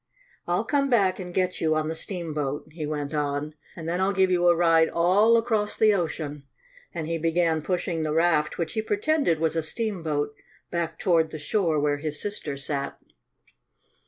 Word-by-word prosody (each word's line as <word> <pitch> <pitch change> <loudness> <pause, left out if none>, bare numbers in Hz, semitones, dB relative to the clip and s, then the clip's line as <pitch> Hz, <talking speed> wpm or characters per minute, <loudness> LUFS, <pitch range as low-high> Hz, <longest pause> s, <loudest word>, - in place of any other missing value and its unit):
"I'll 175 +4 +1
come 275 +4 +1
back 200 -7 +3
and 180 -1 -6
get 185 0 -1
you 155 -1 +2
on 155 0 0
the 160 - -2
steamboat," 155 -5 -3
he 155 -1 -5
went 145 -1 -3
on, 145 0 -2 0.2
"and 165 -1 -7
then 175 +2 -1
I'll 195 +1 +2
give 190 -1 +3
you 175 -1 +3
a 175 - +6
ride 165 -1 +4
all 200 +7 +4
across 220 -3 0
the 215 -1 +5
ocean," 155 -5 -3 0.5
and 165 -2 -4
he 165 +1 -2
began 165 0 +1
pushing 175 0 -2
the 155 -1 -1
raft, 160 -1 +2
which 170 -2 -2
he 220 - 0
pretended 215 - +1
was 160 0 0
a 165 - +1
steamboat, 160 -6 -2 0.4
back 170 -1 -2
toward 165 -4 +2
the 160 - -6
shore 160 +1 0
where 145 0 +1
his 150 0 -3
sister 180 -9 -4
sat. 140 0 -3
165 Hz, 185 wpm, -26 LUFS, 155-190 Hz, 0.5 s, a